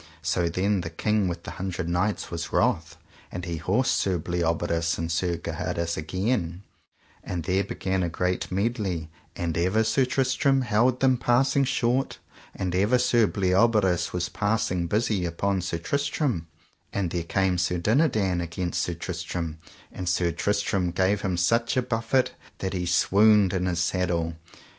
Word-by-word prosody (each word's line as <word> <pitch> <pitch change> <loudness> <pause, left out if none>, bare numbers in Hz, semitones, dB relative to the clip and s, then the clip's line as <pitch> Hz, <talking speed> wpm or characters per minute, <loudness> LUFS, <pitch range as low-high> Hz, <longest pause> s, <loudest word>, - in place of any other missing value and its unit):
So 85 0 +1
then 95 +3 0
the 85 - -5
King 105 +4 0
with 85 -1 -4
the - - -7
Hundred 95 -2 -3
Knights 90 +5 -1
was 85 0 -4
wroth, - - +1 0.3
and 90 -1 -5
he 85 -2 -3
horsed 95 +9 +1
Sir 90 +2 +1
Bleoberis 85 0 -1
and 80 +1 -3
Sir 85 +1 0
Gaheris 85 0 -3
again, 90 +2 -2 0.6
and 85 -2 -4
there 95 +4 +1
began 95 -1 -2
a 85 - 0
great 90 +3 -2
medley; 95 -6 -1 0.2
and 85 -2 -2
ever 95 +6 +2
Sir 130 +4 +2
Tristram 135 +1 +2
held 120 +2 +2
them 130 -1 +4
passing 135 +3 +2
short, 130 0 0 0.4
and 90 -2 -2
ever 100 +7 +3
Sir 120 -3 +3
Bleoberis 95 -1 +2
was 90 -1 -1
passing 100 -5 0
busy 105 0 0
upon 95 +3 -1
Sir 85 -1 -2
Tristram; 140 - -1 0.4
and 95 -4 -2
there 85 - -1
came 90 +2 0
Sir 90 +1 0
Dinadan 105 - +2
against 85 +1 -2
Sir 85 - -2
Tristram, 85 -2 -4 0.3
and 90 -1 -4
Sir 85 0 +1
Tristram 100 -2 0
gave 95 +3 +1
him 95 -2 -1
such 115 +8 +2
a - - +4
buffet 120 +2 +1 0.3
that 95 0 -3
he 90 -2 -2
swooned 100 +2 +4
in 90 -1 0
his 90 -2 -1
saddle. 85 -2 0
95 Hz, 155 wpm, -26 LUFS, 85-110 Hz, 0.6 s, them